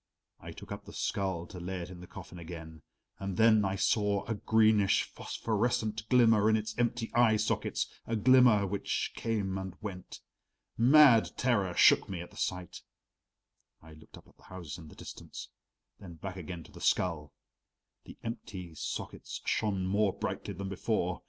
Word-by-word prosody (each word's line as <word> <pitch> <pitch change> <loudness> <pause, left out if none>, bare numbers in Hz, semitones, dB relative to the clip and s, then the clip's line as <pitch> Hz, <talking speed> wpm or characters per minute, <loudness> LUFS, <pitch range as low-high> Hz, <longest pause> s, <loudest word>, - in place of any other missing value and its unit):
I - - -9
took - - -11
up - - -6
the - - -11
skull 95 -4 -2
to 90 - -10
lay 90 +1 -4
it 85 - -7
in 90 - -10
the 90 - -11
coffin 90 0 -10
again 80 -2 -9 0.4
and 95 -2 -4
then 110 -1 +5
I 95 -1 0
saw 100 0 +1
a 115 - -2
greenish 110 -1 +3
phosphorescent 110 -1 -2
glimmer 115 -4 +5
in 110 - +4
its 110 0 -4
empty 120 -1 -1
eye 115 -2 +4
sockets, 105 0 -1 0.2
a 115 - -1
glimmer 120 -2 +5
which 100 +1 -2
came 100 -4 -2
and 95 -1 -6
went. 95 -4 -8 0.5
Mad 125 -1 +6
terror 100 -8 +1
shook - - +5
me 95 -3 -4
at 85 - -8
the - - -17
sight. 90 -2 -4 1.0
I 80 0 -15
looked 80 0 -15
up - - -17
at - - -24
the - - -23
houses 85 -4 -8
in 80 - -11
the - - -14
distance, - - -9 0.5
then 90 -4 -10
back 95 +4 -7
again 90 -2 -7
to - - -17
the - - -12
skull; 80 -5 0 0.7
the - - -12
empty 95 -7 -6
sockets - - -6
shone 100 -4 0
more 100 +1 +2
brightly 100 - -4
than 100 +2 -5
before. 95 -2 -1
100 Hz, 170 wpm, -31 LUFS, 90-110 Hz, 1.0 s, Mad